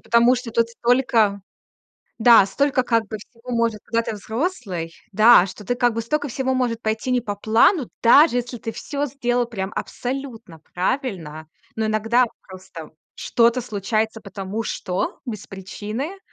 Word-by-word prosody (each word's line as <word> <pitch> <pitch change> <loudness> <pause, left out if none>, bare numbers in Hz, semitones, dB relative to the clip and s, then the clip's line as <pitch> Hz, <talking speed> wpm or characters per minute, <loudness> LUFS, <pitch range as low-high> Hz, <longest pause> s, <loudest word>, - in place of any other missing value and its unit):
потому 235 +2 +4
что 250 -1 -5
тут 230 0 +1
столько 235 -4 +2 0.8
Да, 230 -2 +7
столько, 275 +4 +1
как 230 -3 +1
бы, 215 - -4
всего 230 +4 -13
может, 230 -2 0
когда 230 0 0
ты 225 - -4
взрослый, 220 - -4 0.2
да, 215 -1 +7
что 205 +2 -10
ты, 245 - 0
как 245 -1 +2
бы, 230 - -2
столько 290 +5 -2
всего 260 +2 -1
может 245 -3 -1
пойти 220 +3 -2
не 250 -1 +2
по 210 -3 -4
плану, 230 - +3
даже 260 +3 +6
если 245 0 -3
ты 225 0 -6
всё 285 +4 -4
сделал 245 -2 -1
прям 195 -5 -4
абсолютно 245 -9 -5 0.2
правильно. 180 - -3 0.3
Но 220 - -1
иногда 225 +3 +2 0.2
просто 185 -4 -10 0.3
что-то 235 +1 +2
случается, 220 0 -2
потому 200 +2 -5
что 185 -3 -3
без 215 -4 -6
причины. 215 - -6
230 Hz, 155 wpm, -22 LUFS, 210-250 Hz, 0.8 s, Да